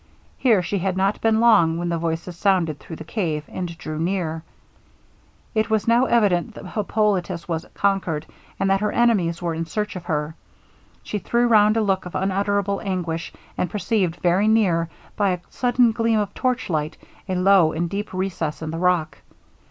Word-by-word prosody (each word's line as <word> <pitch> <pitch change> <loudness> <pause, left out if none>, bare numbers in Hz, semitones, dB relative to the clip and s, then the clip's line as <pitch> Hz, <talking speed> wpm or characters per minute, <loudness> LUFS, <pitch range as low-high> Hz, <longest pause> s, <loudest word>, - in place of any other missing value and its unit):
Here 225 -8 +3
she 200 +3 -2
had 185 +1 -1
not 195 +2 +1
been 220 -1 +3
long 170 -9 +5
when 175 0 -2
the 170 - 0
voices 165 +1 -3
sounded 175 -5 +1
through 165 - -9
the 160 - -8
cave, 160 -4 -2
and 175 -2 -5
drew 155 -1 -5
near. 165 -2 -1 1.1
It 220 -1 +1
was 220 0 +1
now 235 +2 +4
evident 215 -3 +2
that - - -9
Hippolitus 195 -4 -1
was 165 -1 -3
conquered, 190 -6 0 0.3
and 195 - +1
that 195 +1 +2
her 210 0 0
enemies 185 -8 +2
were 170 -1 -1
in 165 +1 -4
search 210 +3 -3
of 180 -2 -7
her. 150 -2 -2 0.7
She 210 - -3
threw 235 +4 +1
round 215 -1 +5
a - - +3
look 195 -3 0
of 180 - -10
unutterable 200 +1 0
anguish, 175 -4 -3 0.3
and 180 - 0
perceived 200 -5 0
very 180 +4 +2
near, 180 -7 +2 0.3
by 200 -3 +2
a 180 - -4
sudden 245 -1 +3
gleam 230 -1 +1
of 205 -2 -1
torchlight, 180 - -1 0.3
a 185 - 0
low 180 -3 +5
and 170 +2 -2
deep 205 +4 -4
recess 180 -5 -3
in 155 - -4
the 165 - -4
rock. 170 -4 +1
190 Hz, 180 wpm, -22 LUFS, 170-210 Hz, 1.1 s, long